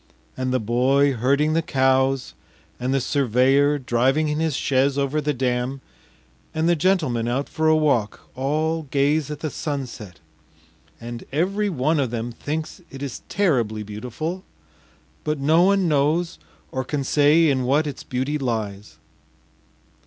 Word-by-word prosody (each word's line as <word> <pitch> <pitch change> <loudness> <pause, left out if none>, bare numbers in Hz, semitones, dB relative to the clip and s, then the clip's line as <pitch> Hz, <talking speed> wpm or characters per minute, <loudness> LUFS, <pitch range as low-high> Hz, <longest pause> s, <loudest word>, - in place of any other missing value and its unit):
And 130 0 -2
the 130 - +1
boy 130 +5 +2
herding 140 +6 +1
the 165 - +2
cows, 130 -2 +1 0.5
and 125 +1 -1
the 135 - +2
surveyor 135 +2 +2
driving 135 +4 +1
in 150 +1 -1
his 160 -3 0
chaise 135 +1 +1
over 140 +2 0
the 150 +1 0
dam, 125 0 -1 0.8
and 160 +1 +1
the 175 - +4
gentleman 155 -10 +1
out 130 +4 -1
for 160 0 -1
a 155 - +5
walk, 140 -9 +1
all 155 +4 -1
gaze 145 +2 +1
at 150 - -6
the 155 - -3
sunset, 125 - -5 0.8
and 120 0 -7
every 195 +8 0
one 155 -1 +1
of 135 -4 0
them 120 +1 -4
thinks 155 - -5
it 135 -1 -6
terribly 120 - +1
beautiful, 125 - -5 0.8
but 150 0 -1
no 155 +5 +3
one 195 0 +3
knows 155 - +1 0.3
or 130 - -2
can 140 +2 -2
say 150 +4 +4
in 135 -3 +1
what 145 +5 +2
its 145 - -5
beauty 135 +4 -2
lies. 110 -5 -4
140 Hz, 145 wpm, -23 LUFS, 125-155 Hz, 0.8 s, a